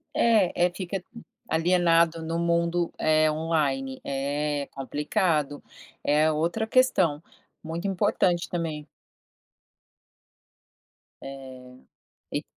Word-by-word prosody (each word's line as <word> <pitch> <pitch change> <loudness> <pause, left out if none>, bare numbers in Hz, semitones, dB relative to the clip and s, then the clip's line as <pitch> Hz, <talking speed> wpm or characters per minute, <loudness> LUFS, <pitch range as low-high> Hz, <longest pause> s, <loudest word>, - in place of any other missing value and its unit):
É, 200 -6 +3
é - - +2
fica 185 0 -4 0.4
alienado 170 -1 +3
no 165 +1 -2
mundo, 170 0 +1
eh, 155 0 +3
online, 145 -4 -1
é 145 +1 -2
complicado, 145 +2 -1 0.4
é 155 +2 +3
outra 170 +9 -1
questão, 185 - +2 0.4
muito 165 +4 -4
importante 180 -2 +1
também. 160 -4 -4 2.3
É, 130 -2 -10 0.5
e - - -2
160 Hz, 85 wpm, -26 LUFS, 145-175 Hz, 2.3 s, É